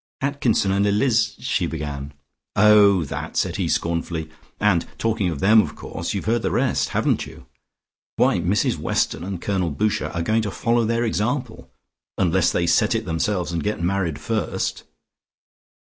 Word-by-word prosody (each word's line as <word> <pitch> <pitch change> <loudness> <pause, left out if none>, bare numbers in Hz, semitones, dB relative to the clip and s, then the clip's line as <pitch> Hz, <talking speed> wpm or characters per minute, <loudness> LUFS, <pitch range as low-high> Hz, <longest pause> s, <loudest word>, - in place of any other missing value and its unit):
"Atkinson 135 -8 +1
and 100 +1 +2
Eliz 115 +2 +2
" - - -29
she 90 - +1
began. 75 -3 -5 0.4
"Oh, 100 -3 +6
that," 70 - -6
said - - 0
he - - -1
scornfully. 85 -1 -2 0.3
"And 100 -5 +2
talking 110 -4 0
of 80 -5 -5
them, 110 +3 +6
of - - -5
course 85 - -5
you've 100 - -3
heard 115 +2 +1
the - - 0
rest. - - 0
Haven't - - 0
you? - - -13 0.7
Why, - - +3
Mrs 90 +5 +1
Weston - - -1
and 95 -1 -4
Colonel 95 -2 -1
Boucher 105 +8 -1
are 85 - -3
going 110 +5 +1
to 105 - -2
follow 115 +3 +1
their 115 +1 0
example, 120 +2 -2 0.5
unless 90 -1 +2
they 85 - 0
set 105 +7 +3
it 110 0 -2
themselves, 85 +2 -1
and 85 -1 -2
get 105 +1 -2
married 90 -4 0
first." 105 +8 -3
100 Hz, 165 wpm, -22 LUFS, 85-110 Hz, 0.7 s, Oh